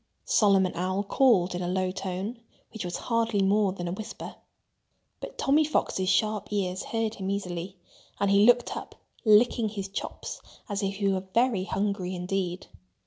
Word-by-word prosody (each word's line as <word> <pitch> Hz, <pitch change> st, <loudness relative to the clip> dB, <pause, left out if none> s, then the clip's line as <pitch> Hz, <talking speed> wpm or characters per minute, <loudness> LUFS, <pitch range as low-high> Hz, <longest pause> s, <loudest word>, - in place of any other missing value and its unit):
Solomon 195 Hz, -3 st, +4 dB
Owl 185 Hz, +3 st, -1 dB
called 200 Hz, -5 st, +3 dB
in 175 Hz, -, -3 dB
a 175 Hz, -, -2 dB
low 185 Hz, 0 st, 0 dB
tone, 195 Hz, +5 st, -4 dB, 0.3 s
which 220 Hz, -, -5 dB
was 175 Hz, -1 st, -3 dB
hardly 230 Hz, -4 st, +1 dB
more 200 Hz, 0 st, +3 dB
than 175 Hz, -2 st, -5 dB
a -, -, -2 dB
whisper. 210 Hz, +4 st, -7 dB, 0.9 s
But -, -, -8 dB
Tommy 290 Hz, +3 st, +3 dB
Fox's 190 Hz, -10 st, 0 dB
sharp 210 Hz, +1 st, +1 dB
ears 190 Hz, -2 st, -1 dB
heard 225 Hz, -1 st, -1 dB
him 190 Hz, -3 st, -4 dB
easily. 185 Hz, -1 st, -4 dB, 0.4 s
And 200 Hz, 0 st, +2 dB
he 200 Hz, +1 st, +6 dB
looked 245 Hz, 0 st, +4 dB
up, -, -, -7 dB, 0.3 s
licking 220 Hz, +1 st, +5 dB
his 200 Hz, -2 st, -5 dB
chops 195 Hz, -, -6 dB, 0.3 s
as 205 Hz, -1 st, -2 dB
if 195 Hz, 0 st, -1 dB
he 200 Hz, 0 st, 0 dB
were 190 Hz, 0 st, -1 dB
very 230 Hz, -6 st, +2 dB
hungry 195 Hz, -2 st, -2 dB
indeed. 180 Hz, 0 st, -2 dB
195 Hz, 165 wpm, -27 LUFS, 185-215 Hz, 0.9 s, he